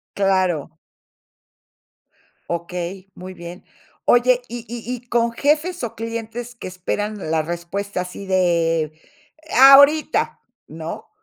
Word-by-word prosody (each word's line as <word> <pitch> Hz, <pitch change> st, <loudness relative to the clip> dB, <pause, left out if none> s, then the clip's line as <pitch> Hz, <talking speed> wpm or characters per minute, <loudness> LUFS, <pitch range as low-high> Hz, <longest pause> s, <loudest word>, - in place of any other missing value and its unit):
Claro. 185 Hz, -6 st, 0 dB, 1.7 s
Okey, 175 Hz, +2 st, -4 dB
muy 185 Hz, +1 st, -9 dB
bien. 175 Hz, +1 st, -10 dB, 0.4 s
Oye, 245 Hz, +1 st, +4 dB
y 235 Hz, 0 st, -6 dB
y 240 Hz, +1 st, -5 dB
y 245 Hz, 0 st, -10 dB
con 235 Hz, -1 st, +1 dB
jefes, 305 Hz, +6 st, 0 dB
o, 230 Hz, -1 st, -5 dB
clientes 230 Hz, +1 st, -5 dB
que -, -, -8 dB
esperan 195 Hz, +1 st, -4 dB
la 160 Hz, -1 st, +2 dB
respuesta 175 Hz, +4 st, -4 dB
así 180 Hz, +2 st, -7 dB
de 170 Hz, -3 st, +2 dB
e 285 Hz, -, -13 dB
¡ahorita!, 280 Hz, +4 st, +6 dB, 0.3 s
¿no? 165 Hz, -, -7 dB
200 Hz, 110 wpm, -21 LUFS, 175-240 Hz, 1.7 s, ahorita